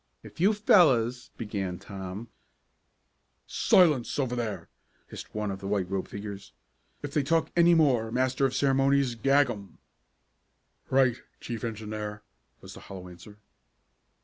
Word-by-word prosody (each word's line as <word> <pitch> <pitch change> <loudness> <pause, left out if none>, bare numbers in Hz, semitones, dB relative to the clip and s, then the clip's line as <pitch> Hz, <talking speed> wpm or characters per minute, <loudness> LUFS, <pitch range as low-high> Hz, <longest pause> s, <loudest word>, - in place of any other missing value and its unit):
"If - - -14
you 195 +5 +4
fellows 130 - +3
" - - -38
began 100 -5 -4
Tom. 95 +4 -8 1.2
"Silence 155 -10 +3
over 130 -4 -1
there!" 105 -8 -4 0.4
hissed - - -10
one 105 -1 -2
of 95 - -6
the 95 - -7
white 100 -2 0
robed 95 -1 -2
figures. 100 -1 -8 0.5
"If 145 -1 -5
they 150 - +2
talk 165 +4 0
any 170 0 +5
more, 130 -8 +3
Master 130 +2 +1
of 130 - -6
Ceremonies, 135 -1 +2
gag 135 +3 +3
'em." 100 -5 -10 1.1
"Right, 130 -2 +3 0.2
Chief 115 -2 -6
Engineer," 105 -2 -5 0.4
was - - -11
the - - -11
hollow 90 -2 -10
answer. 100 +4 -14
120 Hz, 140 wpm, -28 LUFS, 105-135 Hz, 1.2 s, any